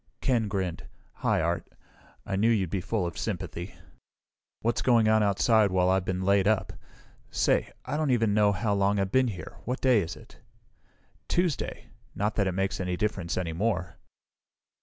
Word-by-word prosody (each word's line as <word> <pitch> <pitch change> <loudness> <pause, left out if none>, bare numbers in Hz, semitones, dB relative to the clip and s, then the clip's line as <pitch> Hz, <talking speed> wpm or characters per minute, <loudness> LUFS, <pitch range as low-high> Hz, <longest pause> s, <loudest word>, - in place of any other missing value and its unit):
Ken 120 -5 +1
grinned. 95 -4 -3 0.3
"Hi, - - +1
Art. - - -1 0.6
I 100 - -2
knew 110 +4 +3
you'd 100 -7 +1
be 95 - -1
full 95 +1 -1
of 85 - -5
sympathy. 85 +3 -4 0.9
What's 115 +1 0
going 115 -3 +4
on 110 0 +4
outside 105 +1 +3
while 95 0 +2
I've 95 -1 +1
been 95 0 -2
laid 100 0 +3
up? 110 -2 +1 0.6
Say - - +1
I 150 - -2
don't 155 -2 0
even 115 -4 +2
know 105 -1 +4
how 105 +2 0
long 100 +1 +2
I've 95 -1 -1
been 130 +1 +3
here! 100 -6 -7
What 125 +3 -2
day 130 -4 +4
is 80 -3 -5
it?" - - -16 0.9
"Tuesday. 175 -4 -1 0.2
Not 105 +2 0
that 100 -3 +1
it 95 - -1
makes 95 +1 -1
any 90 -1 -2
difference 95 -5 -2
any 85 -3 -2
more." 90 -2 -1
100 Hz, 175 wpm, -28 LUFS, 95-110 Hz, 0.9 s, going